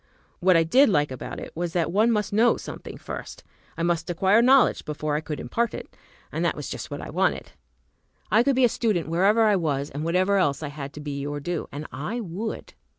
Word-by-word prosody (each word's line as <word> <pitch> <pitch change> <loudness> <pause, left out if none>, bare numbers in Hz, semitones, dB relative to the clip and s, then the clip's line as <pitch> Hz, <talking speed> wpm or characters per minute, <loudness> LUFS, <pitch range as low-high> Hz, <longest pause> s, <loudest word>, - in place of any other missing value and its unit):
What 185 -1 +5
I 165 - +4
did 255 - +5
like 150 -7 +2
about 130 - -6
it - - -8
was 170 0 -3
that 170 -2 0
one 215 +5 +3
must 210 -2 -1
know 230 +3 +4
something - - -8
first. - - -8 0.3
I 165 - -2
must 170 0 0
acquire 190 +6 +3
knowledge 260 +1 +4
before 150 0 -3
I 150 - 0
could 155 -2 -5
impart 230 - -1
it, - - -9 0.4
and - - -2
that - - +1
was - - -6
just - - -6
what - - -6
I - - -7
wanted. - - 0 0.8
I 220 - +6
could 275 +2 +2
be 260 -1 +5
a - - +6
student, 210 -9 -1
wherever 195 +7 +3
I 210 -2 +4
was 145 -4 -1
and 145 +3 -4
whatever 185 +4 +2
else 145 -5 +1
I 145 - -3
had 140 -1 -7
to 150 - -8
be 140 -2 -4
or 145 0 -3
do, 170 +3 -3
and 145 +2 -6
I 150 - -4
would! 210 +2 -5
175 Hz, 225 wpm, -25 LUFS, 150-215 Hz, 0.8 s, I